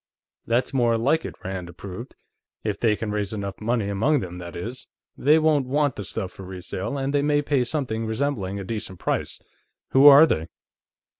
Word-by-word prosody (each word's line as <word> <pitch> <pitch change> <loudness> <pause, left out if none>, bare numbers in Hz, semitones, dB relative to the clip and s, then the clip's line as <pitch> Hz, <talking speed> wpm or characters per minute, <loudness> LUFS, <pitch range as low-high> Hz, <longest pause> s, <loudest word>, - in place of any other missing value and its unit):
"That's 120 +4 +1
more 120 -3 +3
like 145 +8 +1
it," - - -6
Rand 95 -2 -5
approved. 95 +7 -9 0.5
"If 105 -2 -2
they 110 -3 +3
can 105 0 -4
raise 105 -1 -2
enough 100 -2 -5
money 115 -1 0
among 120 +9 +2
them, 90 -1 -6
that 85 -2 -8
is. 115 +9 -6 0.3
They 150 +4 +4
won't 155 -4 +2
want 145 0 +1
the 105 - -5
stuff 95 0 -4
for - - -12
resale, 95 +6 -5
and 135 +1 -2
they 145 - +3
may 145 0 +2
pay 140 -3 +2
something 120 -4 -2
resembling 110 -5 -2
a - - -5
decent 105 -2 -5
price. - - -2 0.5
Who 135 +2 +7
are 145 +2 +10
they?" 80 - -1
115 Hz, 190 wpm, -24 LUFS, 100-140 Hz, 0.5 s, are